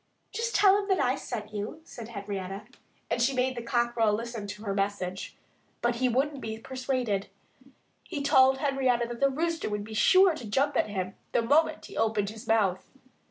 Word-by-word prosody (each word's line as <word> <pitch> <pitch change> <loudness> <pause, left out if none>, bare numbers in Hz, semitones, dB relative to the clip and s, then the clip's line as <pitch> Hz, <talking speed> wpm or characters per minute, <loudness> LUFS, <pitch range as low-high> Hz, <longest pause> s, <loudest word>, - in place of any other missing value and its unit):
"Just 460 +2 -2
tell 400 0 +6
him 395 - -7
that 385 -2 +2
I 255 +1 +2
sent 215 -5 -6
you," 210 +9 -4
said 235 -8 -9
Henrietta. 200 -2 -5 0.5
And 235 +1 +1
she 265 +3 +2
made 255 +1 +1
the 240 - -4
cockerel 235 -2 +1
listen 230 -1 -4
to 205 +1 -8
her 200 -2 -2
message. 195 -2 -3 0.4
But 240 0 0
he 255 +1 +2
wouldn't 270 +3 0
be 220 0 -4
persuaded. 255 -4 -2 0.7
He 290 -6 -5
told 265 -2 +5
Henrietta 265 -4 +1
that 240 -1 -6
the 275 - +4
Rooster 330 +3 -1
would 210 0 -3
be 220 +1 -9
sure 370 - +5
to 250 -8 -7
jump 275 +7 +1
at - - +1
him 190 -2 -3 0.2
the 235 - +2
moment 295 +7 +2
he - - -11
opened 215 -2 +1
his 220 0 -11
mouth. 200 -5 +1
235 Hz, 190 wpm, -28 LUFS, 210-270 Hz, 0.7 s, tell